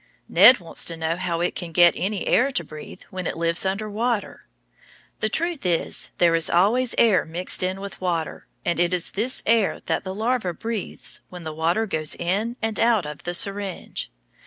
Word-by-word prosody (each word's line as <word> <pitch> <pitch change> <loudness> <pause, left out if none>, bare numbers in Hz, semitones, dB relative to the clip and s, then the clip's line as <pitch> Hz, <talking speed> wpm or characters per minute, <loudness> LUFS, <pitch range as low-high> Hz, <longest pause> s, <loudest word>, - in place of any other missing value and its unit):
Ned 215 +9 +8
wants 170 -4 -1
to 165 - -3
know 160 0 -1
how 175 -2 -2
it 175 - 0
can 175 -2 -5
get 175 +1 +6
any 200 +1 -2
air 260 +3 +3
to 170 - 0
breathe 155 -1 -11
when 185 -2 -4
it - - -4
lives 170 +2 +1
under 200 +3 -2
water. 220 +1 -2 0.7
The 215 - 0
truth 335 +5 -1
is, 175 -3 0
there 170 -1 +4
is 165 -1 +2
always 230 +8 +2
air 220 -5 +4
mixed 170 +3 -1
in 185 +1 -1
with 200 -1 -8
water, 170 -3 -3 0.2
and 170 - 0
it 175 +1 +3
is 175 - -3
this 235 +6 -2
air 225 -2 +2
the 190 0 -3
larva 220 -5 -1
breathes 225 +1 -5
when 180 -1 -9
the 160 -1 -5
water 170 +8 +1
goes 155 -7 -2
in 205 +8 -1
and 225 -1 -1
out 225 -6 +3
of 150 -1 -7
the 175 0 -2
syringe. 200 +1 -1
185 Hz, 190 wpm, -23 LUFS, 170-215 Hz, 0.7 s, Ned